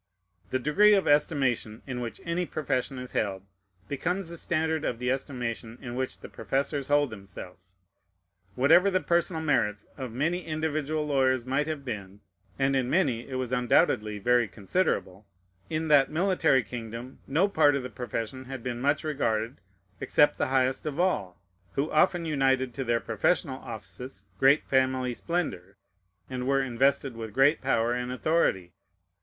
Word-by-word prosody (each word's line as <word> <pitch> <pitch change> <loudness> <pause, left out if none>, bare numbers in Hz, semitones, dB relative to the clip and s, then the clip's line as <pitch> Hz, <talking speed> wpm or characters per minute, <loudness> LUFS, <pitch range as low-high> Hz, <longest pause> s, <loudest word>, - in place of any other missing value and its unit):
The 130 - +1
degree 200 +11 +5
of 195 - +1
estimation 135 -7 +1
in 125 -3 -4
which 115 -3 -5
any 170 +1 -1
profession 135 -3 -2
is 125 0 -7
held 95 -2 -2 0.4
becomes 175 - -2
the 170 - -7
standard 160 -1 0
of 120 - -1
the 125 +1 -1
estimation 120 -4 -4
in 120 -2 -7
which 130 +1 -4
the - - -8
professors 140 0 -2
hold 145 -2 +2
themselves. 95 -3 -11 0.8
Whatever 165 +9 +5
the 185 -1 +2
personal 170 -2 0
merits 105 -9 +1
of 130 -4 -5
many 165 +9 -1
individual 155 -1 -2
lawyers 130 -4 +2
might 135 +3 0
have 155 -3 -4
been, 100 -4 -6 0.4
(and 135 0 +2
in 130 -2 0
many 130 -9 +1
it 130 - -5
was 130 -1 -3
undoubtedly 110 -4 +2
very 120 +2 +3
considerable,) 100 - -2 0.4
in 160 0 -2
that 145 -2 +5
military 170 -6 +2
kingdom 115 +3 -7
no 165 +8 +3
part 155 -7 +4
of 140 - -2
the 125 - -5
profession 120 +2 -5
had 130 -2 -7
been 120 -1 -4
much 145 +2 +1
regarded, 115 - -1 0.4
except 150 0 +3
the - - +1
highest 130 +2 +1
of 150 +1 -4
all, 100 - 0 0.3
who 145 +3 -1
often 175 +2 +3
united 135 -4 +1
to 135 - -3
their 120 -1 +1
professional 130 - 0
offices 125 +4 -8
great 135 +3 +5
family 130 -1 +1
splendor, 115 - -3 0.5
and 125 -1 -4
were 135 0 +3
invested 135 +1 +1
with 115 -1 -6
great 140 +4 +4
power 120 -3 +1
and 125 0 -3
authority. 125 - 0
130 Hz, 160 wpm, -28 LUFS, 120-150 Hz, 0.8 s, degree